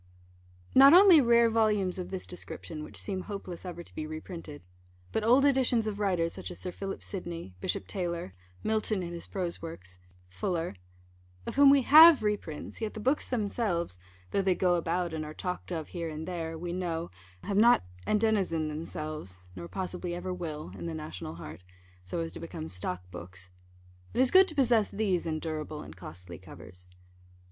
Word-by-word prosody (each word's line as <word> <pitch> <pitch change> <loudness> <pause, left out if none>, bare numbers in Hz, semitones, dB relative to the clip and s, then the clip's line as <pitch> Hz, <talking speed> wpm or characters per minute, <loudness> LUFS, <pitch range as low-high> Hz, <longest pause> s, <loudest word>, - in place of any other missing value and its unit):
Not 275 +4 +9
only 365 -4 +9
rare 235 -1 +5
volumes 210 -5 +1
of 180 - -5
this 190 -1 -5
description, 165 -3 -7
which - - -10
seem 190 -2 -4
hopeless 190 -3 -7
ever 175 -1 -6
to - - -18
be 155 - -4
reprinted; 155 - -8 0.5
but 220 - 0
old 250 +5 +5
editions 255 -5 +3
of 210 -1 -3
writers, 180 -5 +1
such - - -6
as - - -8
Sir 180 - -5
Philip 195 +1 -6
Sydney, 170 - -6
Bishop - - -2
Taylor, 170 - -4 0.3
Milton 215 -2 0
in 170 0 -5
his 170 - -6
prose 180 -3 -4
works, 95 - -9 0.3
Fuller 165 - -2 0.7
of - - -4
whom 280 0 +7
we 275 -1 +6
have 310 0 +9
reprints, 205 -7 -3
yet 220 -1 -3
the - - -5
books 265 +7 +1
themselves, 200 - -1 0.3
though 200 - +2
they 190 -1 +2
go 180 -1 +2
about, 175 0 0
and 155 -1 -3
are 155 0 -8
talked 180 0 -5
of 160 -3 -4
here 170 -2 -4
and 155 +1 -6
there, 165 -2 -4
we 175 +1 -4
know, 170 -2 -3 0.3
have 200 - -1
not 235 - +6 0.2
endenizened 200 -8 +1
themselves 155 - -6
(nor 85 -2 -7
possibly 180 -2 -4
ever 185 +1 -4
will) 155 -4 -5
in - - -6
the 165 - -4
national 125 - -6
heart, 85 +1 -9 0.4
so 90 - -3
as 165 - -4
to - - -9
become 160 -1 -6
stock 90 0 -5
books 90 +1 -9 0.6
it - - 0
is 260 -1 +4
good 380 0 +8
to 315 - -6
possess 240 -6 +3
these 195 -5 0
in 160 -1 -1
durable 155 -1 -5
and - - -11
costly 90 0 -10
covers. 90 0 -13
175 Hz, 180 wpm, -30 LUFS, 155-215 Hz, 0.7 s, Not